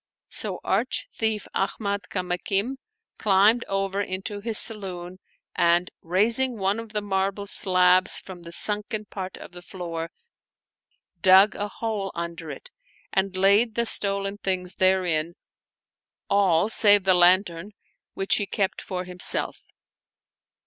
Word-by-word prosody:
So - - -4
arch - - -1
thief 220 -2 -2
Ahmad 200 +1 -3
Kamakim 195 +6 -2 0.4
climbed 210 +3 +3
over 195 0 -2
into 200 +2 -5
his 220 +1 -2
saloon 185 -5 -1 0.4
and, 170 +1 +2
raising 225 +8 +1
one 195 +2 -1
of 230 -1 -9
the 210 -1 -2
marble 195 0 -2
slabs 185 -2 +5
from 185 -2 -9
the 170 0 -11
sunken 210 +3 0
part 190 -2 -7
of - - -12
the 175 0 -11
floor, 170 -3 -6 1.1
dug 190 +2 +6
a 205 - -4
hole 205 -2 -4
under 170 -1 -6
it - - -10 0.4
and 190 0 -1
laid 205 +4 +3
the 235 - 0
stolen 200 -1 0
things 185 -2 -2
therein, 175 -3 +1 1.0
all 195 -3 +3
save 205 -3 +4
the 190 -1 +4
lantern, 180 +1 +2 0.4
which 195 - +1
he 205 - -2
kept 195 +1 -2
for 185 -2 -5
himself. 180 0 +1
195 Hz, 130 wpm, -24 LUFS, 180-205 Hz, 1.1 s, dug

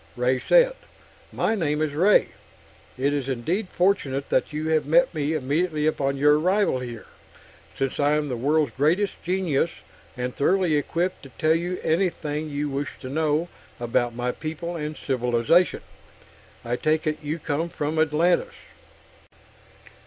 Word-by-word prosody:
Ray 125 +1 +1
said: - - +4 0.6
"My - - 0
name 155 -8 0
is 155 -2 -1
Ray. 185 +8 +4 0.7
It 140 +3 +1
is 140 -2 -2
indeed 165 - -1
fortunate 145 -8 0
that - - +1
you 155 +1 -3
have 155 -2 +1
met 170 +4 +4
me 150 -1 -1
immediately 155 +2 0
upon 140 -3 0
your 150 +2 +4
arrival 185 -4 +2
here, 120 -3 -7 0.7
since 135 -1 -2
I 145 +1 +3
am 150 -1 0
the 130 - -3
world's 145 +2 +1
greatest 170 +9 +2
genius, 175 -4 +1 0.5
and 125 0 -3
thoroughly 180 +2 +2
equipped 170 +5 -1
to 135 - -12
tell 155 0 +3
you 175 +2 -2
anything 155 -3 -1
you 145 0 -2
wish 140 +1 -3
to 130 - -6
know 155 +3 0 0.3
about 120 0 0
my 125 +1 -1
people 165 +4 -5
and 150 -1 -4
civilization. 125 +6 +2 0.8
I 120 +1 -1
take 155 +3 0
it 155 0 -1
you 150 +2 -3
come 160 +1 -2
from 155 0 -2
Atlantis?" 170 - +2
150 Hz, 150 wpm, -24 LUFS, 140-170 Hz, 0.8 s, said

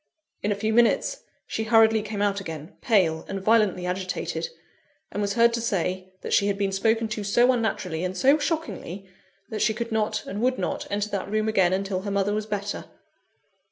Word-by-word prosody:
In 205 - 0
a - - +1
few 220 +2 -1
minutes, 240 - +3 0.2
she 220 - -3
hurriedly 220 0 +5
came 210 -1 -3
out 200 -1 +1
again, 160 -4 -7
pale, 185 -10 +2
and 195 - -3
violently 200 -3 +2
agitated; 185 - -3 0.6
and 205 - -3
was 200 -1 0
heard 235 0 +5
to 235 - -1
say, 185 -3 -2
that - - -4
she 200 - +4
had 200 -1 0
been 200 -1 0
spoken 225 +3 +1
to 215 -1 -3
so 240 +5 +4
unnaturally, 195 -8 -1
and 185 0 -3
so 275 +9 +5
shockingly, 215 - -3 0.4
that 215 - -3
she 215 0 +2
could 235 +1 -4
not, 215 -1 0
and 205 +3 -4
would 255 +1 +2
not, 180 - -3
enter 205 +1 -1
that 200 -1 -3
room 215 +1 0
again 190 -5 +3
until 190 0 -1
her 200 - -4
mother 200 +1 +1
was 215 0 -2
better. 205 -1 -3
205 Hz, 195 wpm, -25 LUFS, 195-225 Hz, 0.6 s, hurriedly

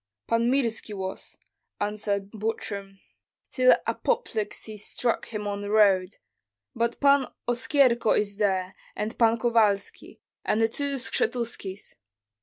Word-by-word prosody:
"Pan 230 +1 +1
Mirski 230 -5 -1
was," 190 0 -6 0.4
answered 205 -1 -2
Butrym, 200 -2 -4 0.5
"till 255 -1 +5
apoplexy 220 - -2
struck 230 +3 -2
him 210 -2 -5
on 200 0 -3
the 205 - -5
road; 200 -3 +3 0.6
but 235 +1 -1
Pan 280 -2 +4 0.2
Oskyerko 245 -1 +3
is 205 -1 -1
there, 190 -3 0 0.2
and 210 +1 -3
Pan 230 -1 +4
Kovalski, 220 -4 0 0.2
and 215 - +1
the 225 - +4
two 280 +4 -1
Skshetuskis." 235 -6 -2
220 Hz, 115 wpm, -26 LUFS, 205-235 Hz, 0.6 s, till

